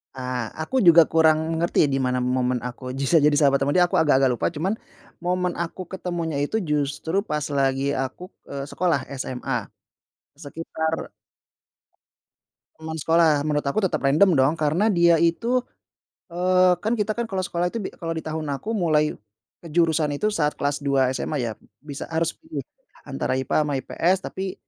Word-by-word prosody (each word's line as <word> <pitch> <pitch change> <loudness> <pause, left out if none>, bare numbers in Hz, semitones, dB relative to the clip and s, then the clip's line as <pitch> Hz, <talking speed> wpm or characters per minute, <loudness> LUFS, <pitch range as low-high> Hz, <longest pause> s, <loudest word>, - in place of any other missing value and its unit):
Ah, 125 -2 -3
aku 260 +11 0
juga 170 -5 +7
kurang 160 0 +3
ngerti 170 +1 0
di 135 - 0
mana 125 -1 0
momen 125 -1 0
aku 125 +1 -6
bisa 140 +4 +3
jadi 150 0 +3
sahabat 140 -2 +4
ama 145 - 0
dia, 180 - +6
aku 175 - +2
agak-agak 135 -4 +4
lupa, 120 - 0
cuman 185 +7 0 0.5
momen 180 0 0
aku 170 +2 -4
ketemunya 170 -5 -3
itu 180 - -3
justru 150 +5 0
pas 150 -7 -3
lagi 135 0 +1
aku, 135 +7 -4 0.2
eee, 140 -1 -5
sekolah 170 -5 +1 0.2
SMA, 130 -1 -3 0.7
sekitar 160 +1 -4 1.7
Teman 160 0 -6
sekolah. 160 -1 +3
Menurut 150 -1 0
aku 140 +9 0
tetap 155 -5 -3
random, 155 +6 +4
dong, 135 +2 +3
karena 160 +9 +2
dia 170 -2 +5
itu, 230 +10 +1 0.7
eee, 180 +1 +3
kan, 220 +6 -1
kita, 215 0 -2
kan, 235 - -1
kalau 190 -4 -2
sekolah 175 -1 -1
itu 220 +5 -3
bi 190 - -4
kalau 165 -1 -5
di 160 - -4
tahun 155 0 -4
aku 210 +10 -5
mulai 155 -4 +2 0.5
kejurusan 160 -2 +1
itu 210 +9 0
saat 150 -7 0
kelas 145 0 -1
2 140 -2 +1
SMA, 140 +3 -3
ya, - - -4 0.3
bisa 145 -2 -7
harus 165 0 0
pilih, 320 0 -6 0.4
antara - - -3
IPA 130 -1 -1
ama 145 - -2
IPS, 180 +7 0
tapi 190 -1 -5
160 Hz, 165 wpm, -23 LUFS, 140-175 Hz, 1.7 s, juga